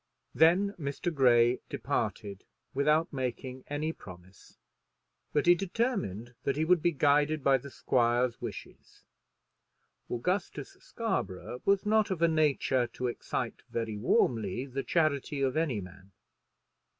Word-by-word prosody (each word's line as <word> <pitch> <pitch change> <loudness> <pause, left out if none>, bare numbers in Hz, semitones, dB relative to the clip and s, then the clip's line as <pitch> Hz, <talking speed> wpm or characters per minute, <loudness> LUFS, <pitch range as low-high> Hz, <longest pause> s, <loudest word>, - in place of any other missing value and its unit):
Then 175 +8 +4
Mr. 145 +4 -3
Grey 120 -3 +4
departed, 100 -2 -3 0.3
without 150 +4 +2
making 130 0 -4
any 155 +2 -2
promise, 90 - -14 0.7
but 145 - +1
he 175 - +8
determined 180 - -2
that 140 - -1
he 155 +2 0
would 180 0 +4
be 175 - +2
guided 145 0 +2
by 135 -1 +4
the 140 - -10
squire's 120 -1 +1
wishes. - - -9 1.1
Augustus 180 - -2
Scarborough 125 - -4
was 200 0 +2
not 215 0 +3
of 175 -3 -1
a - - +6
nature 145 -5 +2
to 125 - -4
excite 120 - -3
very 115 -2 -3
warmly 110 +1 +1
the 135 0 -4
charity 145 -3 0
of 130 -1 0
any 155 -9 0
man. 95 +1 -12
140 Hz, 125 wpm, -30 LUFS, 120-165 Hz, 1.1 s, he